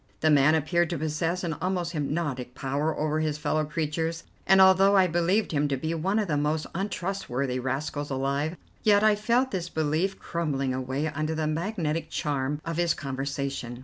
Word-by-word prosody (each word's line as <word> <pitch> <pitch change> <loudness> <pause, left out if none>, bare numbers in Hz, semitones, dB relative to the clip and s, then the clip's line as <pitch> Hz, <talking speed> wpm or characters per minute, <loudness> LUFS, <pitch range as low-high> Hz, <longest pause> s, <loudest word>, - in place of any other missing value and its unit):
The 155 - +4
man 145 +2 +5
appeared 160 +2 +1
to 170 - -2
possess 160 +4 -1
an 165 -2 -1
almost 180 -2 -1
hypnotic 145 -5 -3
power 140 +4 -1
over 155 0 0
his 155 -1 -1
fellow 155 +1 0
creatures, 160 +2 -2 0.2
and 190 +1 +6
although 190 +1 +6
I 190 - +6
believed 180 +5 +1
him 145 -1 +1
to 140 -1 -1
be 160 +5 -2
one 185 +6 0
of 215 -2 +1
the 150 -3 0
most 150 +2 0
untrustworthy 170 -9 -2
rascals 140 +3 -3
alive, 140 +4 -1 0.2
yet 205 -1 +4
I 215 -1 +6
felt 235 +5 +1
this 175 -3 -3
belief 160 +5 0
crumbling 140 -6 -2
away 130 +3 -2
under 155 +1 -2
the 155 0 -1
magnetic 160 -1 -2
charm 145 -1 -1
of 165 -1 -3
his 170 -1 +2
conversation. 135 -3 -4
155 Hz, 180 wpm, -27 LUFS, 145-175 Hz, 0.2 s, and